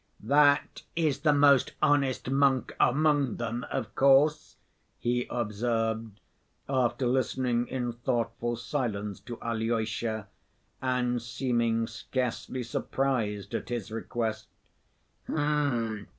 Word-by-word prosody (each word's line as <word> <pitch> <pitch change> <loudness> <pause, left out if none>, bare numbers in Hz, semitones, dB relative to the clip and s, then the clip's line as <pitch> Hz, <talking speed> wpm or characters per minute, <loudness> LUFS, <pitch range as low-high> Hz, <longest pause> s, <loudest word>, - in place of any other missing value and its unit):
"That 145 +4 +3
is 155 -5 +1
the 150 0 +3
most 140 -2 +5
honest 140 -4 +2
monk 135 -1 +2
among 145 -1 +3
them, 120 +1 -4
of 105 -2 -3
course," 140 +3 +4 0.4
he 120 +1 -1
observed, 115 -1 -2 0.5
after 125 -2 +1
listening 125 -1 +1
in 125 -2 -2
thoughtful 120 0 -1
silence 110 -6 -3
to 120 -2 -8
Alyosha, 115 -1 -1 0.5
and 125 -2 0
seeming 120 -1 0
scarcely 125 +1 -3
surprised 110 -4 -2
at - - -3
his 120 -2 -4
request. 110 -1 -3
120 Hz, 95 wpm, -29 LUFS, 115-135 Hz, 0.5 s, most